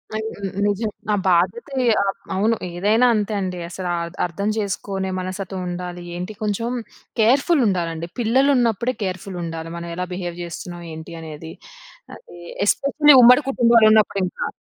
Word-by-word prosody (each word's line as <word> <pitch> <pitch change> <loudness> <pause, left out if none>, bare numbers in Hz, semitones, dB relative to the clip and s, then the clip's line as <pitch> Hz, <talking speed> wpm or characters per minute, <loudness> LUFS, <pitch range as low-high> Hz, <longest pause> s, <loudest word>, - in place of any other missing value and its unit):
On 220 0 -3 0.4
నిజం. 205 +2 0 0.2
ఆ - - +4
బాధ్యతే 185 +10 +1 0.2
ఆ! - - +2 0.3
అవును. 220 +4 +2 0.2
ఏదైనా 215 +7 +3
అంతే 210 0 -1
అండి 180 -1 -3
అసలా 180 0 -4
అర్ద 170 - -7
అర్థం 200 +4 -3
చేసుకోనే 195 -2 -3
మనస్తత్వంముండాలి. 180 -1 -5
ఏంటి 180 +4 -5
కొంచెం 215 +3 -1 0.5
కేర్‌ఫుల్ 275 +8 +4
ఉండాలండి, 170 -3 -2
పిల్లలున్నప్పుడే 245 -1 +2
కేర్‌ఫుల్ 185 0 -4
ఉండాలి. 165 0 -6
మనం 170 0 -6
ఎలా 180 +1 -2
బిహేవ్ 175 -1 -5
చేస్తున్నాం? 175 +1 -7
ఏంటి 160 +1 -9
అనేది? 160 0 -8 0.6
అది 470 - -15 0.3
ఎస్పెషల్లీ 285 +6 +4
ఉమ్మడి 250 +5 +7
కుటుంబాలున్నప్పుడు 220 -5 +4
ఇంకా. 180 - -4
195 Hz, 130 wpm, -21 LUFS, 175-230 Hz, 0.6 s, ఉమ్మడి